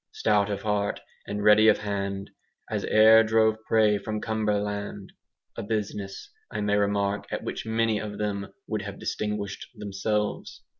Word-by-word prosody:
Stout 105 -1 +2
of 100 -1 -3
heart 105 -1 0 0.3
and 105 0 -3
ready 105 +1 +6
of - - +6
hand, 100 -1 -3 0.4
As - - -1
e'er 110 +1 +7
drove 110 0 +2
prey 105 -2 +4
from 110 +1 -4
Cumberland; 105 -2 -2 0.4
a - - -4
business, 105 - -4 0.2
I - - -3
may 105 0 +1
remark, 100 0 0
at - - -4
which - - -5
many 110 -1 +1
of 105 -1 -6
them 100 -2 -3
would 110 -2 -2
have 100 -1 -7
distinguished 105 -2 -3
themselves. 105 +1 -3
105 Hz, 150 wpm, -26 LUFS, 100-110 Hz, 0.4 s, e'er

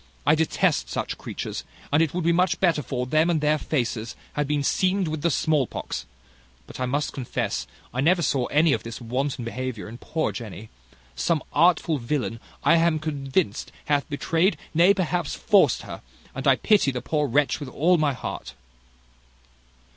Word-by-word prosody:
I 145 - +5
detest 160 0 +1
such - - -3
creatures; - - -5 0.3
and 150 - +5
it 160 -3 +2
would 180 0 -2
be 170 - +3
much 180 +1 +2
better 170 -5 +2
for 125 -2 -3
them 155 +5 +2
that 170 -3 +2
their 150 +1 +2
faces 120 -5 -2 0.2
had 145 -1 -1
been 145 -1 0
seamed 185 +5 +1
with 155 -1 -3
the 170 - +2
smallpox; 150 -4 -1 0.6
but - - -11
I 130 - 0
must 145 +4 -1
confess, 130 -3 -3 0.3
I 125 - 0
never 170 +4 +3
saw 130 -6 +1
any 155 0 +3
of - - -1
this 115 -1 -7
wanton 125 +1 -2
behaviour 125 -1 -4
in 115 +3 -9
poor 160 0 -1
Jenny: 110 -2 -8 0.5
some 155 - 0
artful 165 -1 +3
villain, 120 -2 -2 0.2
I 170 - +5
am 165 -1 +3
convinced, 145 - -2
hath 145 0 0
betrayed, 165 +6 +1 0.2
nay 170 +4 +6
perhaps 175 -3 -1
forced 205 -3 +3
her; - - -8 0.3
and - - -3
I - - +7
pity 210 -10 +3
the 125 -2 -3
poor 150 +1 0
wretch 145 +3 +2
with 145 -3 -6
all 170 +6 +3
my 150 -2 +2
heart." 125 - -6
150 Hz, 175 wpm, -25 LUFS, 130-165 Hz, 0.6 s, I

